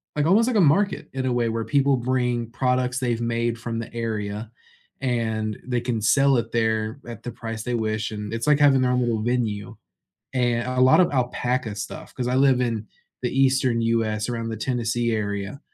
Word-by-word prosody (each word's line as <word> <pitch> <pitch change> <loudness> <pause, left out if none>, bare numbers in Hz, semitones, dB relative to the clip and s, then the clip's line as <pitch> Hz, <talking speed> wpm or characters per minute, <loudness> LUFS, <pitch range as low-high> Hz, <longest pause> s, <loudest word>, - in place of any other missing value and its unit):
like, 150 +1 +1
almost 220 +6 +4
like 250 - 0
a 205 - +5
market 185 +6 +2
in 130 -1 -2
a 125 - +1
way 120 -1 +1
where 115 0 -2
people 140 -2 +2
bring 120 -2 -1
products 125 0 0
they've 120 -3 -1
made 115 0 -1
from 115 -1 -4
the 115 - -6
area, 110 -1 -4 0.5
and 110 -4 -1
they 125 -2 -1
can 120 -2 -1
sell 135 +4 +4
it 115 -1 -2
there 110 +1 0
at 115 -3 -8
the 120 - -5
price 115 -1 -6
they 125 - -3
wish, 110 -1 -1
and 105 0 -5
it's 115 - -3
like 150 -1 +4
having 135 -3 +5
their 125 0 +2
own 125 - +2
little 115 -3 0
venue. 115 -2 -1 0.6
And 120 -1 +1
a 130 0 -1
lot 130 +7 +6
of 180 - +4
alpaca 125 -3 -1
stuff 100 -2 -7
'cause 125 -1 -3
I 125 - 0
live 130 -2 +4
in 115 -3 -1 0.4
the 125 - 0
Eastern 130 -3 +2
US 115 -1 0
around 115 -1 -3
the 110 - -4
Tennessee 120 +1 -1
area. 100 +3 -3
120 Hz, 200 wpm, -24 LUFS, 110-130 Hz, 0.6 s, lot